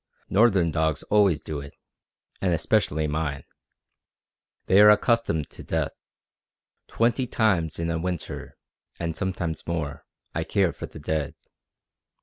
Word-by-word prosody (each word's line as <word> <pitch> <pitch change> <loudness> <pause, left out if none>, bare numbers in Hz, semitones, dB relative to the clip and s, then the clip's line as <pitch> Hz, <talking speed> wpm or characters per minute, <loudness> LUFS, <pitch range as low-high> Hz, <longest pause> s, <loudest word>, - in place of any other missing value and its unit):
"Northern 95 -5 +4
dogs 80 -2 0
always 100 -7 +4
do 75 -2 -5
it, 70 0 -10 0.7
and 90 -3 +2
especially 80 -5 +1
mine. 75 -2 -2 1.2
They 95 +2 +6
are 105 - +9
accustomed 105 - +2
to - - -10
death. - - -1 1.0
Twenty 120 +2 +1
times 95 -10 +1
in 85 - -2
a 80 - -1
winter, 90 -1 -5 0.4
and 85 -1 -2
sometimes 90 -4 -3
more, 80 -4 -3 0.3
I 85 - -1
care 95 0 +1
for - - -7
the - - -12
dead. 75 -1 -2
85 Hz, 130 wpm, -25 LUFS, 80-100 Hz, 1.2 s, are